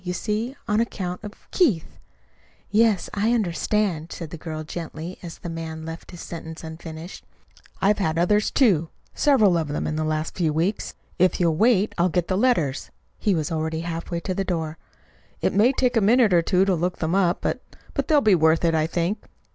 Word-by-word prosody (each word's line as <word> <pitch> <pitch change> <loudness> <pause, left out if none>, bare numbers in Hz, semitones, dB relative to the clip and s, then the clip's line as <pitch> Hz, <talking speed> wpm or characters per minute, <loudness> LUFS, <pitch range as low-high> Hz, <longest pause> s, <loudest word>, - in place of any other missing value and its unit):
You 180 -1 -3
see, 215 +7 -2
on 210 -1 +2
account 185 -5 -4
of 210 0 -10
Keith 240 - +1 0.4
" - - -35 0.3
"Yes, 215 -3 +3
I 215 +3 +1
understand," 185 -4 0
said 165 -3 -7
the - - -5
girl 155 -1 -5
gently, 165 +2 -7
as 170 -2 -8
the - - -8
man 160 -1 -5
left 165 +1 -8
his 175 - -9
sentence 160 -1 -8
unfinished. 160 +1 -8 0.6
"I've 205 +2 +3
had 160 -5 0
others, 205 +5 +3
too 180 - +3 0.2
several 220 - +4
of 160 - -2
them 145 - -2
in 155 - -2
the 155 - 0
last 155 0 -1
few 165 -4 +1
weeks. 175 +7 -1 0.2
If 185 +1 +3
you'll 170 -3 +2
wait 215 +1 +3
I'll 175 +2 +4
get 175 0 -1
the 185 - +1
letters." 180 - +1 0.3
He 205 -4 +2
was 155 -2 -2
already 160 0 -2
halfway 170 0 -4
to 185 - -2
the 195 - -1
door. 160 -4 -3 0.6
"It - - 0
may 220 +6 +5
take 250 -2 +1
a 225 - +4
minute 220 0 +4
or 170 - +5
two 185 +2 +2
to 195 - +2
look 180 +1 -1
them 160 +1 -1
up; 185 -2 +2
but - - -4
they'll 300 -3 +4
be 215 -6 +4
worth 160 0 +4
it, 165 - +3
I 155 0 +2
think." 175 +5 -1
175 Hz, 200 wpm, -24 LUFS, 160-210 Hz, 0.6 s, may